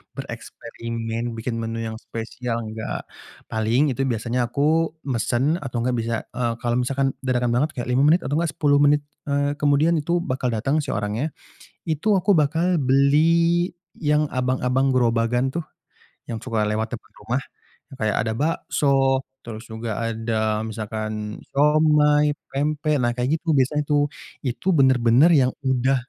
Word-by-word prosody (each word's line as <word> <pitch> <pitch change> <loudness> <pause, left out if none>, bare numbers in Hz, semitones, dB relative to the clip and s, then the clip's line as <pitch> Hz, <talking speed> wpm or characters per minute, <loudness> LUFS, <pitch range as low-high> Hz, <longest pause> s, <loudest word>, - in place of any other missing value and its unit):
bereksperimen, 115 -2 -5
bikin 115 +1 -3
menu 115 0 -3
yang 110 0 -5
spesial, 115 +1 -5
enggak, 110 0 -5 0.5
paling 115 +6 +2
itu 130 - -6
biasanya 120 +1 -1
aku 155 +6 +1
mesen 135 +4 0
atau 135 -6 -7
gak 125 0 0
bisa, 115 0 -2
eee, 120 -2 -1
kalau 120 0 +1
misalkan 135 +2 0
dadakan 125 -2 0
banget 135 +6 +2
kayak 120 -1 -4
5 125 - +2
menit 165 +4 +4
atau 145 +3 0
gak 170 - +1
10 145 -1 +3
menit, 145 0 +4 0.2
eee, 145 0 0
kemudian 145 +3 +3
itu 170 +3 0
bakal 130 -3 -2
datang 135 +8 0
si 150 - -4
orangnya, 105 +9 -2 0.5
itu 165 +7 0
aku 195 +2 +1
bakal 165 +4 +2
beli 160 +6 +3 0.2
yang 150 -1 +1
abang-abang 130 +1 +1
gerobakan 120 +1 +2
tuh 170 +3 -4 0.6
yang 115 - -3
suka 115 -3 -1
lewat 110 +1 -1
depan - - -20
rumah, 125 +3 -2 0.5
kayak 110 -5 -1
ada 110 - 0
bakso, 135 -2 +1 0.2
terus 115 -2 -9
juga 110 -1 -4
ada 110 -1 -1
misalkan 110 -1 -5
siomay, 150 0 +3 0.2
pempek, 150 +1 0
nah 120 -1 0
kayak 130 +6 0
gitu 160 -2 0
biasanya 140 +3 +2
tuh. 145 -1 +2 0.3
Itu 130 +9 0
benar-benar 130 +2 +5
yang 130 -5 +3
sudah 130 0 +2
130 Hz, 145 wpm, -23 LUFS, 115-150 Hz, 0.6 s, benar-benar